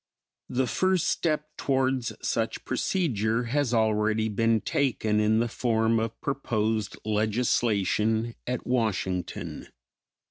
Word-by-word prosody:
The 130 Hz, +1 st, +1 dB
first 185 Hz, -, +1 dB
step 155 Hz, -2 st, -1 dB
towards 130 Hz, -3 st, 0 dB, 0.2 s
such -, -, -1 dB
procedure 115 Hz, -, 0 dB
has 130 Hz, +2 st, 0 dB
already 110 Hz, -1 st, +2 dB
been 115 Hz, +1 st, +2 dB
taken 110 Hz, -6 st, 0 dB
in 105 Hz, +1 st, +3 dB
the 120 Hz, +1 st, +2 dB
form 115 Hz, -1 st, +1 dB
of 115 Hz, 0 st, -3 dB
proposed 110 Hz, -6 st, -1 dB
legislation 110 Hz, 0 st, +1 dB
at 125 Hz, 0 st, -2 dB
Washington. 95 Hz, -7 st, -2 dB
115 Hz, 105 wpm, -27 LUFS, 110-125 Hz, 0.2 s, in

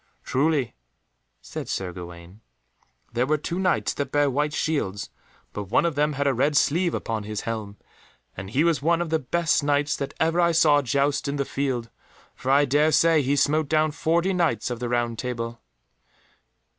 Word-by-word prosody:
"Truly," 140 Hz, -2 st, 0 dB, 0.7 s
said -, -, -7 dB
Sir 95 Hz, -2 st, -3 dB
Gawaine, 85 Hz, +2 st, -11 dB, 0.7 s
"there 120 Hz, +2 st, +1 dB
were 155 Hz, +1 st, +2 dB
two 170 Hz, +4 st, -4 dB
Knights 185 Hz, -2 st, +1 dB
that 140 Hz, -2 st, -4 dB
bare 145 Hz, -1 st, +2 dB
white 145 Hz, +3 st, 0 dB
shields, 140 Hz, -11 st, -2 dB, 0.4 s
but 105 Hz, -, -5 dB
one 110 Hz, -, +2 dB
of 170 Hz, -, 0 dB
them 150 Hz, +1 st, +1 dB
had 140 Hz, 0 st, -2 dB
a 140 Hz, -, +3 dB
red 140 Hz, +4 st, +1 dB
sleeve 170 Hz, +5 st, +2 dB
upon 110 Hz, -1 st, -3 dB
his 105 Hz, 0 st, -5 dB
helm, 110 Hz, -3 st, -5 dB, 0.6 s
and 95 Hz, +1 st, -7 dB
he 135 Hz, +8 st, +1 dB
was 165 Hz, -4 st, +2 dB
one 170 Hz, +3 st, +2 dB
of 175 Hz, -2 st, -3 dB
the 160 Hz, -, +2 dB
best 160 Hz, +3 st, +1 dB
Knights 145 Hz, +1 st, +1 dB
that 140 Hz, -, -5 dB
ever 165 Hz, +2 st, +2 dB
I 170 Hz, -1 st, +3 dB
saw 155 Hz, -3 st, +5 dB
joust 140 Hz, +2 st, 0 dB
in 140 Hz, -, -2 dB
the 140 Hz, -1 st, -1 dB
field, 130 Hz, -5 st, -3 dB, 0.4 s
for 130 Hz, -, -6 dB
I 140 Hz, +2 st, +5 dB
dare 145 Hz, +3 st, +3 dB
say 165 Hz, -1 st, +4 dB
he 140 Hz, +1 st, +1 dB
smote 145 Hz, +1 st, +1 dB
down 155 Hz, 0 st, +2 dB
forty 170 Hz, +5 st, 0 dB
Knights 155 Hz, -, 0 dB
of 120 Hz, -, -4 dB
the 125 Hz, -, -3 dB, 0.3 s
Table 125 Hz, -2 st, -3 dB
Round." 115 Hz, 0 st, -9 dB
145 Hz, 185 wpm, -24 LUFS, 120-155 Hz, 0.7 s, saw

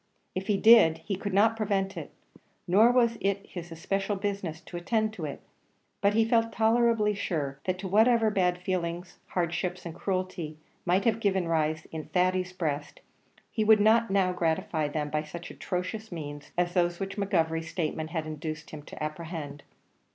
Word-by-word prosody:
If 185 Hz, +1 st, -4 dB
he 205 Hz, -, +2 dB
did, 220 Hz, -7 st, +7 dB
he 200 Hz, -, -1 dB
could 200 Hz, +2 st, -4 dB
not 215 Hz, +4 st, +4 dB
prevent 200 Hz, -3 st, -1 dB
it -, -, -7 dB, 0.6 s
nor 210 Hz, +7 st, +6 dB
was 235 Hz, -2 st, +2 dB
it 200 Hz, 0 st, 0 dB
his 175 Hz, -2 st, -8 dB
especial 195 Hz, +5 st, -2 dB
business 195 Hz, -5 st, -3 dB
to 180 Hz, -, -11 dB
attend 215 Hz, +5 st, 0 dB
to 175 Hz, -7 st, -5 dB
it; 145 Hz, -, -6 dB, 0.6 s
but 200 Hz, +1 st, +3 dB
he 225 Hz, 0 st, +4 dB
felt 230 Hz, 0 st, +2 dB
tolerably 225 Hz, -1 st, +3 dB
sure 145 Hz, -9 st, -3 dB
that 185 Hz, 0 st, 0 dB
to 190 Hz, +1 st, -5 dB
whatever 220 Hz, +3 st, +4 dB
bad 180 Hz, -3 st, +2 dB
feelings 175 Hz, -1 st, -3 dB
hardships 180 Hz, +1 st, -2 dB
and 170 Hz, -, -5 dB
cruelty 185 Hz, -4 st, -3 dB, 0.3 s
might 185 Hz, +3 st, +2 dB
have 225 Hz, -1 st, +2 dB
given 190 Hz, -5 st, +1 dB
rise 160 Hz, -1 st, 0 dB
in 160 Hz, -1 st, -5 dB
Thady's 185 Hz, 0 st, +1 dB
breast, 155 Hz, -5 st, -3 dB, 0.5 s
he 220 Hz, -, 0 dB
would 215 Hz, 0 st, +6 dB
not 225 Hz, +2 st, +4 dB
now 190 Hz, -2 st, +2 dB
gratify 160 Hz, -2 st, 0 dB
them 150 Hz, 0 st, -3 dB
by 150 Hz, -, +1 dB
such 170 Hz, +3 st, -8 dB
atrocious 195 Hz, +4 st, -4 dB
means 145 Hz, -3 st, -7 dB
as 175 Hz, 0 st, +1 dB
those 175 Hz, -1 st, +1 dB
which 195 Hz, 0 st, -4 dB
McGovery's 165 Hz, -5 st, 0 dB
statement 160 Hz, -2 st, -2 dB
had 160 Hz, -2 st, -3 dB
induced 155 Hz, 0 st, -6 dB
him 155 Hz, -, -7 dB
to 150 Hz, -, -8 dB
apprehend. 155 Hz, -2 st, -5 dB
185 Hz, 175 wpm, -28 LUFS, 160-205 Hz, 0.6 s, did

